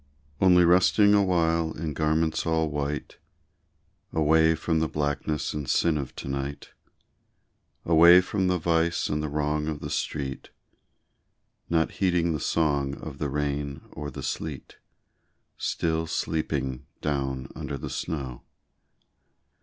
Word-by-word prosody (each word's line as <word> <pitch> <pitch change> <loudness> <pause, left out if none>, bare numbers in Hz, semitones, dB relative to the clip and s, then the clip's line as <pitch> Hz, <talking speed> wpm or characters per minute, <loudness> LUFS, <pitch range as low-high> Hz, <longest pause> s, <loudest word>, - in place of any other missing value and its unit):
Only 90 -2 +6
resting 95 +4 +5
awhile 85 -5 +2
in 75 -1 -4
garments 80 +1 +1
all 80 -1 +1
white, 75 0 -4 0.9
Away 80 +1 +4
from 80 0 0
the 80 - +1
blackness 75 0 -2
and 75 -3 -4
sin 85 -2 +2
of 70 -4 -4
to - - -7
night; 70 +1 -4 1.1
Away 85 +2 +8
from 95 +1 -1
the 90 0 +2
vice 85 0 +1
and 75 0 -1
the 75 - -3
wrong 75 +1 -1
of 75 -2 -3
the - - -6
street, 70 -2 -3 1.2
Not 80 -1 +2
heeding 85 -3 +1
the 75 - -2
song 70 -3 0
of 70 -3 -9
the 75 - -1
rain 70 0 -2
or 75 0 -6
the - - -8
sleet, 75 -5 -5 0.8
Still 80 0 -1
sleeping 70 -5 -2
down 65 -3 -2
under 70 - -5
the - - -6
snow. 65 -6 -4
80 Hz, 130 wpm, -26 LUFS, 70-80 Hz, 1.2 s, Away